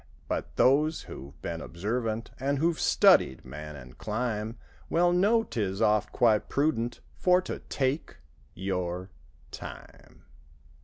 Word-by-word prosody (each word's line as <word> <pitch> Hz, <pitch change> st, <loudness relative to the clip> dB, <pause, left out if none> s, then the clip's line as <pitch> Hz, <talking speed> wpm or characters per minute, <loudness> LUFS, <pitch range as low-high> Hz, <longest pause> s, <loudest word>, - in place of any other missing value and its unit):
But -, -, -3 dB
those 150 Hz, +4 st, +3 dB
who've 70 Hz, +3 st, -10 dB
been 85 Hz, -1 st, -3 dB
observant. 110 Hz, +5 st, -3 dB
And 140 Hz, +2 st, 0 dB
who've 165 Hz, +3 st, +1 dB
studied 65 Hz, -, +4 dB
man 75 Hz, +3 st, -8 dB
and 65 Hz, -2 st, -11 dB
clime. 110 Hz, +1 st, -2 dB, 0.3 s
Well 175 Hz, +1 st, +3 dB
know 210 Hz, +6 st, +4 dB
'tis 100 Hz, -, -2 dB
oft 105 Hz, 0 st, +2 dB
quite 110 Hz, -4 st, +3 dB
prudent 120 Hz, -5 st, 0 dB
For 180 Hz, 0 st, +4 dB
to -, -, -5 dB
take—your—time. 90 Hz, -, -5 dB
110 Hz, 110 wpm, -28 LUFS, 90-140 Hz, 0.3 s, studied